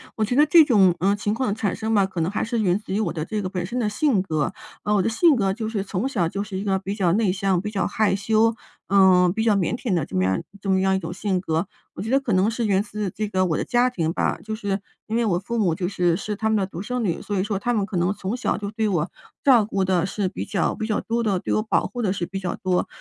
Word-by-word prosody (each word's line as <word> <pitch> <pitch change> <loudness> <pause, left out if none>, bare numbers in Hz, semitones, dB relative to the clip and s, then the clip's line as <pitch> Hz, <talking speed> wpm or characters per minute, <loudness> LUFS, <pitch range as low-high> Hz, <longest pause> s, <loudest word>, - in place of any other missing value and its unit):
我 220 - 0
觉 235 +4 -1
得 295 +2 +6
这 320 +1 +7
种， 195 - +4
呃， 200 +2 +2
情 205 0 -1
况 230 0 -1
的 200 - -1
产 210 -4 -1
生 220 0 -2
吧， 200 - +4
可 190 -3 -4
能 160 - 0
还 - - -1
是 230 +1 -1
源 185 -3 +2
自 210 - -7
于 205 - +1
我 195 -6 0
的 160 -2 -4
这 210 +3 -3
个 185 - -3
本 180 -2 -3
身 240 +7 -3
的 215 -3 0
性 225 -3 +2
格。 160 0 -1 0.3
啊， 210 - 0
我 205 - +3
的 210 - +1
性 305 +6 +4
格 195 -4 +1
就 220 0 -4
是 215 -3 -2
从 195 +4 -2
小 190 -11 0
就 200 +3 -3
是 205 -2 -6
一 - - -4
个 195 -2 +1
比 195 +1 -4
较 190 -5 +1
内 210 -3 +2
向、 195 -2 +1
比 210 +3 -4
较 195 -4 0
害 215 -1 +1
羞， 220 +3 +2 0.3
嗯， 185 -2 +5
比 220 +2 -1
较 220 -2 +3
腼 195 +3 0
腆 235 -4 -2
的 165 -6 +1
这 - - -9
么 95 - +2
样 95 0 +1 0.2
这 195 - -4
么 190 0 +3
样 190 0 +2
一 - - 0
种 165 -1 -6
性 185 -1 -1
格。 165 +1 -1 0.3
我 - - -6
觉 225 - -4
得 270 - +4
可 260 -5 -4
能 190 +3 +3
是 230 0 -2
源 195 -1 +3
自 210 -2 -4
这 215 +3 -4
个 185 -2 +1
我 160 - 0
的 - - -1
家 245 +1 +2
庭 165 -9 -2
吧， - - 0
就 220 - -5
是 205 -2 -2 0.3
因 220 - -2
为 235 - +1
我 175 -5 +1
父 235 +5 -4
母 180 -6 +2
就 175 +2 -2
是 175 -3 +1
是 210 +4 -4
他 220 +2 -1
们 220 - +2
的 195 -2 0
独 180 -1 -7
生 250 +3 -3
女， 175 -6 -1
所 205 - -3
以 - - +1
说 205 -1 -2
他 245 +3 -1
们 210 -4 +1
可 200 -2 -4
能 180 +3 +1
从 195 +3 -4
小 255 - -1
就 205 -1 -4
对 220 0 -1
我， 175 -4 -1 0.3
照 245 -6 +5
顾 200 -2 -1
得 180 -2 +1
是 195 0 -2
比 - - -5
较 190 -5 0
比 220 - -3
较 215 -1 0
多 235 +1 -1
的 200 -4 +1
对 - - -2
我 - - +2
保 220 - +1
护 245 - -5
得 200 -4 +1
是 175 - -3
比 195 +2 -5
较 185 - -3
多。 185 -1 0
200 Hz, 330 characters per minute, -23 LUFS, 185-220 Hz, 0.3 s, 这